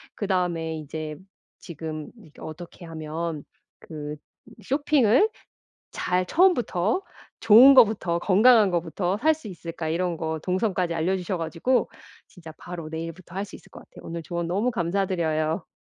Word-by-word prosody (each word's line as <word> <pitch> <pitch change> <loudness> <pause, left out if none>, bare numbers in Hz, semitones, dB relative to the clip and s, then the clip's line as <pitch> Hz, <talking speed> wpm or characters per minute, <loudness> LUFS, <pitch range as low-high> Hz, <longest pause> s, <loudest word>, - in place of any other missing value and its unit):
그다음에 175 -5 -1
이제 155 0 -6 0.4
지금 155 -2 -7
이 165 -9 -17
‘어떻게 170 +2 -9
하면 160 -1 -5 0.4
그 150 -2 -7 0.5
쇼핑을 275 - +3 0.6
잘 180 0 -1
처음부터, 245 - +2 0.5
좋은 265 +5 +10
것부터, 210 -8 +4
건강한 210 +1 +5
것부터 175 +3 -1
살 315 +7 +3
수 305 -8 -11
있을까.‘ 165 -2 -6
이런 175 +1 -1
것 160 0 -3
동선까지 185 -2 0
알려주셔 180 +2 -1
가지고 165 +10 0 0.4
진짜 165 -4 -13
바로 170 -3 -8
내일부터 165 +2 -7
할 195 - -2
수 - - -12
있을 - - -20
것 - - -11
같아요. - - -16
오늘 165 0 -5
조언 170 0 -3
너무 205 +8 0
감사드려요. 170 -3 -1
175 Hz, 305 characters per minute, -25 LUFS, 160-205 Hz, 0.6 s, 좋은